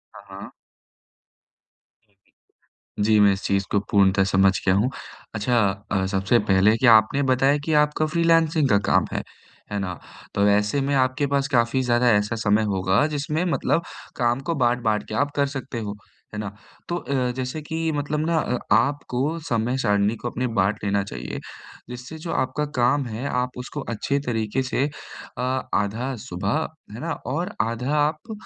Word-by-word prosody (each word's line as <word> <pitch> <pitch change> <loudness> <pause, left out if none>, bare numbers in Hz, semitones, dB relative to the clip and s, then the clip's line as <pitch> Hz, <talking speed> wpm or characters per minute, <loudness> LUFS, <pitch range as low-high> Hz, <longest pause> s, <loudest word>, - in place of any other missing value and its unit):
हाँ, - - -11 0.2
हाँ। 100 - -9 2.5
जी, 105 +1 +4
मैं 100 -1 +6
इस 95 - -5
चीज़ 100 0 0
को 100 - +3
पूर्णतः 95 -1 +4
समझ 95 0 +4
गया 95 - +4
हूँ। 105 +6 +2 0.5
अच्छा 115 +3 +1 0.3
अ, 95 -2 +1
सबसे 95 +4 +2
पहले 95 +3 +5
कि 130 - 0
आपने 115 +4 +5
बताया 135 +3 +3
कि 160 - 0
आपका 150 +1 +3
फ्रीलांसिंग 165 -2 +2
का 100 - +5
काम - - +3
है, - - -2 0.5
है 100 - -1
ना। 90 -3 -4 0.4
तो 100 0 +3
ऐसे 105 +6 +2
में 140 +1 0
आपके 130 +2 +1
पास 140 0 0
काफ़ी 120 +1 +2
ज़्यादा 120 0 +3
ऐसा 105 +2 +1
समय 110 -1 +2
होगा 95 +2 +1
जिसमें 150 +2 -2
मतलब 170 - +1 0.3
काम 120 +1 +1
को 165 - +1
बाँट-बाँट 120 -4 +1
के 110 - -5
आप 145 +3 +1
कर 140 - +2
सकते 135 -3 -5
हो, 105 -2 -5 0.4
है 105 - -4
ना? 105 -2 -4 0.4
तो 175 - -1
अ, 130 -5 -1
जैसे 130 +4 -4
कि 160 +2 -2
मतलब 150 +1 -2
ना 165 0 +1
अ, 125 -4 -1 0.2
आपको 145 +2 0
समय 120 +2 0
सारिणी 105 -3 +1
को 120 - -5
अपने 125 +2 -2
बाँट 100 +3 +1
लेना 100 0 +1
चाहिए 65 -11 -6 0.5
जिससे 125 +5 -8
जो 165 +2 -6
आपका 130 +3 -1
काम 130 +3 +2
है, 115 +2 -5
आप 125 0 -2
उसको 125 +4 -6
अच्छे 140 +6 -1
तरीके 115 +2 -1
से 130 +1 0 0.5
अ, - - -3 0.3
आधा 110 +6 -1
सुबह 155 +3 -1 0.3
है 110 - -7
ना, 165 +3 -3
और 170 - -4
आधा 115 +6 -1
आप 155 +8 -1
125 Hz, 170 wpm, -23 LUFS, 105-145 Hz, 2.5 s, मैं